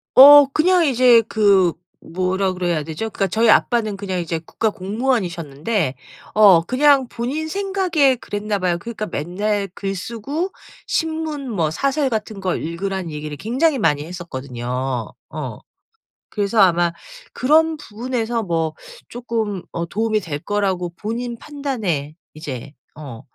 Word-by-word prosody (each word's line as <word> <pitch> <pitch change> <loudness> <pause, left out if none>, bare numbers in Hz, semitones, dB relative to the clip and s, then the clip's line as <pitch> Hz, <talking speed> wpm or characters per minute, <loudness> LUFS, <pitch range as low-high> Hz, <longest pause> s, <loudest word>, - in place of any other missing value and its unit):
어. 290 +2 +10
그냥 355 +2 +4
이제 250 -4 +5
그 200 -6 +3 0.3
뭐라 185 +2 -1
그래야 175 -4 -1
되죠? 160 +9 -4
그러니까 195 -2 -1
저희 225 +5 +2
아빠는 215 -3 +3
그냥 190 -2 -3
이제 165 -1 -3
국가 215 +7 -2
공무원이셨는데 185 - -2 0.4
어 200 -6 +7
그냥 270 +5 +3
본인 275 +7 -3
생각에 375 -8 +1
그랬나 205 -3 -3
봐요. 180 -2 0
그러니까 215 +2 -5
맨날 200 +6 -2
글 195 -1 -3
쓰고 255 - -4 0.4
신문 315 -4 -2
뭐 165 -7 0
사설 275 - 0
같은 215 -3 -3
걸 185 -2 -2
읽으라는 185 +1 -4
얘기를 150 0 -6
굉장히 265 - +1
많이 150 -6 +1
했었거든요. 130 -7 -4 0.2
어. - - -6 0.7
그래서 205 +2 -1
아마 175 -2 +4 0.4
그런 315 +4 +3
부분에서 235 -2 -3
뭐 165 -5 -1 0.4
쪼끔 225 -5 -3
어 170 0 -3
도움이 215 +4 0
될 155 -6 -5
거라고 190 0 -1
본인 235 +4 -4
판단에 220 - -3 0.2
이제 140 -3 -7 0.2
어 135 -6 -9
205 Hz, 290 characters per minute, -20 LUFS, 170-250 Hz, 0.7 s, 어